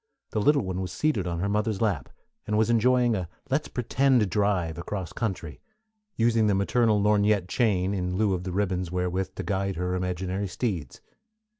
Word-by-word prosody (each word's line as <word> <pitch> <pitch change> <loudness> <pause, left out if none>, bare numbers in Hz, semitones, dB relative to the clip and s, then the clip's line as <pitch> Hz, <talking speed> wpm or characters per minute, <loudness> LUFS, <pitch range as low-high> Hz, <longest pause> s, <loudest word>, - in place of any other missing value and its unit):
The 110 - 0
little 145 +4 +4
one 95 -1 -3
was 90 -1 -4
seated 120 -12 0
on 85 -1 -2
her 100 - 0
mother's 105 0 0
lap, 100 - 0 0.4
and 105 0 +1
was 110 +1 +3
enjoying 120 0 +3
a 90 -4 -3 0.2
"let's 150 +3 +1
pretend" 125 -1 +2
drive 90 -5 0
across 90 -1 -5
country, 95 -8 -4 0.5
using 115 -1 +3
the 100 - +3
maternal 110 +2 +2
lorgnette 105 -2 +3
chain 100 -4 +1
in 90 -2 -2
lieu 105 0 +2
of 90 -1 -2
the 90 - -4
ribbons 90 -2 -1
wherewith 90 +1 -2
to - - -4
guide 95 -1 -1
her 90 +1 -2
imaginary 90 +2 -2
steeds. 95 - -3
100 Hz, 175 wpm, -26 LUFS, 90-110 Hz, 0.5 s, little